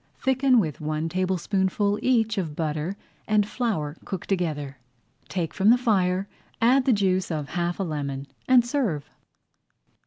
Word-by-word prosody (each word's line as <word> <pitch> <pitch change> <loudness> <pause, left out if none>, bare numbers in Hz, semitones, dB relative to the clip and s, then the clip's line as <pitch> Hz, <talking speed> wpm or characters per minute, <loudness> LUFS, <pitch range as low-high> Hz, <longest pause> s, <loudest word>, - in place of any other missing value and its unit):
Thicken 265 -1 +3
with 155 -8 -2
one 155 +1 -2
tablespoonful 190 +3 0
each 225 -4 +2
of 160 -5 -4
butter 155 +3 -2 0.3
and 210 -1 +3
flour 170 - -2
cooked 190 -3 -6
together. 150 -8 -2 0.5
Take 170 -4 -2
from 200 +2 +3
the 240 - +7
fire, 195 -5 +1 0.3
add 255 +3 +4
the 265 - +4
juice 190 -4 +1
of 150 -4 -3
half 175 +1 -2
a - - +1
lemon, 140 -5 -3 0.2
and 250 -2 +6
serve. 235 - -1
185 Hz, 145 wpm, -25 LUFS, 155-225 Hz, 0.5 s, the